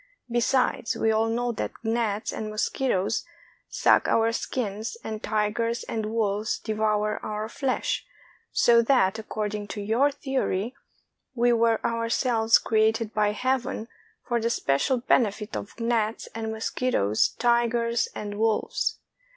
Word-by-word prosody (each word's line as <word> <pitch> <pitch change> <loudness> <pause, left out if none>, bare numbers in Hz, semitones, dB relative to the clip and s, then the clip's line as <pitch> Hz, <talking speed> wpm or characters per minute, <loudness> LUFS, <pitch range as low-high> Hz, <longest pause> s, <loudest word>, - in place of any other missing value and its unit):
Besides, 240 0 +1
we 220 - +2
all 220 +1 +2
know 240 +1 0
that 230 - -4
gnats 225 -2 -1
and 215 - -4
mosquitoes 215 -1 0 0.5
suck - - +3
our 225 0 +3
skins, 225 - -3
and 215 -1 -5
tigers 220 +2 -1
and 220 -2 -3
wolves 215 -1 0
devour 215 -1 -1
our 215 0 -3
flesh; 260 +3 -1 0.5
so 235 -1 +5
that, 225 -5 +2
according 210 -1 -4
to 205 - -6
your 225 +8 +2
theory, 265 -6 -2 0.6
we 240 0 +3
were 230 -1 +3
ourselves 230 0 +2
cre 220 - -1
ated 220 0 +2
by 210 -1 +2
Heaven 255 -1 -1 0.4
for 240 -2 0
the 230 - +1
special 185 - +1
benefit 215 -3 +1
of 205 - -7
gnats, 230 -1 0
mos 220 0 -3
quitoes, 110 - +1
tigers, 235 -1 +2
and 205 0 -5
wolves! 225 -1 0
225 Hz, 130 wpm, -26 LUFS, 215-235 Hz, 0.6 s, so